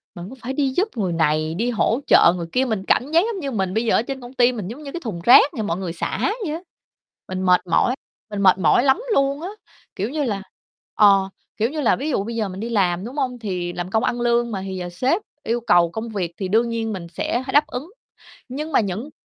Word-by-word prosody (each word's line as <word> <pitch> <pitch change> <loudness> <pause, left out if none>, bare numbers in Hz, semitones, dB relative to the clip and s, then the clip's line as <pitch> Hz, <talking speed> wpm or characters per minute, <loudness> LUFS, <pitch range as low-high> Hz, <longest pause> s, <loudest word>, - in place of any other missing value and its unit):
mình 175 +2 -8
cứ 260 - -10
phải 255 +3 -4
đi 275 -1 +1
giúp 390 +4 +3
người 190 -5 0
này, 155 0 +1
đi 230 +7 0
hỗ 235 +1 +1
trợ 170 - +6
người 170 -2 -5
kia, 255 +6 +2
mình 220 -6 -2
cảm 270 +4 +2
giác 335 +4 +4
giống 395 - -5
như 280 -5 -4
mình 190 -5 -1
bây 225 +3 0
giờ 225 - +3
ở - - +4
trên 265 +2 -6
công 245 +1 -10
ty 250 -1 +4
mình 215 -7 -5
giống 250 +9 -8
như 280 - -7
cái 345 - -5
thùng 195 -8 -5
rác 245 +6 +7
cho 220 - -1
mọi 170 -4 -2
người 185 -3 -4
xả 170 - -1
vậy 305 - -2
á. 330 - -7 0.7
Mình 185 0 -4
mệt 180 0 +3
mỏi, 175 +9 +2 0.3
mình 205 -1 -3
mệt 185 -2 +5
mỏi 185 +7 +4
lắm 275 - +3
luôn 275 -1 +1
á, 355 - -4 0.5
kiểu 205 +4 -2
như 295 +2 -2
là, 205 -7 -2 0.5
ờ, 195 -2 +5 0.3
kiểu 225 +2 +1
như 305 +2 -3
là, 240 - +3
ví 285 +5 -3
dụ 225 -9 0
bây 230 +3 -5
giờ 215 -3 -1
mình 185 +1 -7
đi 230 +3 -4
làm, 190 -4 +1
đúng 250 +4 -8
hông? 255 -3 -1
Thì 180 -5 -3
làm 175 +1 -4
công 220 +3 +1
ăn 240 - -1
lương 240 0 +1
mà, 195 -3 -3
thì 190 -1 -5
giờ 180 -1 -5
sếp 260 - 0 0.2
yêu 235 +2 -1
cầu 175 -6 +4
công 220 +4 -5
việc 190 -6 -3
thì 190 - -3
đương 225 +5 +2
nhiên 225 -1 -2
mình 180 -3 -6
sẽ 240 +9 -2
h - - -3
đáp 295 +2 +4
ứng. 280 +8 -6 0.6
Nhưng 300 +5 -5
mà - - +4
những 210 +7 -4
225 Hz, 265 wpm, -22 LUFS, 185-260 Hz, 0.7 s, rác